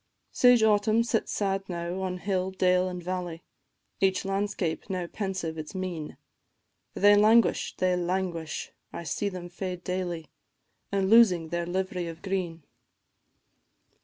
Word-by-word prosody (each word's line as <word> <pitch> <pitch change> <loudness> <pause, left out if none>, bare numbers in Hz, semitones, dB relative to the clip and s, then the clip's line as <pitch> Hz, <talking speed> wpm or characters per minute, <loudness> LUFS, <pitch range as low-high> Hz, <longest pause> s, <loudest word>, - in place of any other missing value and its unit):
Sage 245 -2 +5
Autumn 215 +1 +4
sits 230 -1 -1
sad 195 -1 -1
now 175 +1 -3
on 185 -1 -2
hill, 185 0 -1
dale, 185 -1 +2
and 180 -1 -6
valley, 175 -2 -4 0.6
Each 190 0 +2
landscape 195 -4 -2
how 185 -2 -2
pensive 180 -4 -4
its 155 +5 -7
mien! 180 -5 -4 0.8
They 205 +1 +6
languish, 220 +3 +4
they 185 -1 +2
languish! 175 -3 -2 0.2
I - - -6
see 200 +6 -2
them 180 -2 -7
fade 180 0 -5
daily, 175 -4 -3 0.6
And 195 -1 +1
losing 190 -7 +5
their 170 0 -2
liv'ry 185 -1 -2
of 165 0 -10
green. 180 -4 -3
185 Hz, 135 wpm, -28 LUFS, 175-195 Hz, 0.8 s, They